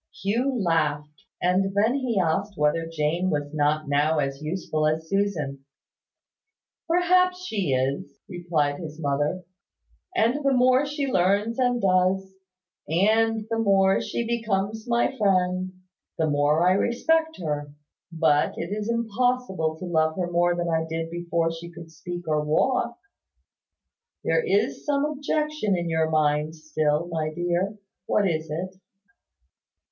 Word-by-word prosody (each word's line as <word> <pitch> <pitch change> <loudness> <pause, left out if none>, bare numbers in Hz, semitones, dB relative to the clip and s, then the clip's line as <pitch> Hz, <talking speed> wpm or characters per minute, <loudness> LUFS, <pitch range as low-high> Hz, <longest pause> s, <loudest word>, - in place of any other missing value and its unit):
Hugh 245 +6 0
laughed; 150 -4 -1 0.2
and 190 +2 +1
then 215 +4 +3
he 255 -6 0
asked 195 +3 -1
whether 150 +2 +1
Jane 165 +4 0
was 145 -2 -2
not 150 0 +1
now 145 +3 +2
as 135 -1 -2
useful 155 -1 -1
as 160 +1 -1
Susan. 160 -9 -1 1.2
"Perhaps 365 +1 +2
she 200 - -1
is," 135 +8 -2
replied 170 -6 -1
his 155 -2 -8
mother; 145 +4 -1 0.7
"and 250 +4 +2
the 275 -1 +3
more 255 +2 +4
she 290 0 -2
learns 205 +1 +1
and 245 -1 +2
does, 190 +1 +2 0.6
and 220 +5 +2
the 225 - 0
more 195 -3 +3
she 235 - -3
becomes 220 -1 -2
my 235 +3 +1
friend, 185 -2 +1 0.5
the 160 - +1
more 150 +3 +2
I - - +5
respect 320 - +1
her: 145 -3 -3 0.4
but 160 -3 +2
it 170 +3 -4
is 210 +1 -4
impossible 235 -7 0
to 185 - -7
love 160 -2 +1
her 175 -2 -2
more 175 0 +2
than 175 0 -2
I 160 -1 +1
did 165 0 -3
before 170 -1 -1
she 165 +1 -8
could 170 -1 -12
speak 175 +1 -7
or 150 -1 +1
walk. 235 +10 +1 1.3
There 480 - +2
is 415 -1 0
some 285 -1 +1
objection 300 -7 -1
in 170 -1 -2
your 160 -1 +1
mind 155 0 +1
still, 155 0 -1
my 160 -2 -2
dear. 175 +5 -1 0.3
What 205 -2 +2
is 160 -2 -2
it?" 185 +5 -5
180 Hz, 140 wpm, -25 LUFS, 155-225 Hz, 1.3 s, I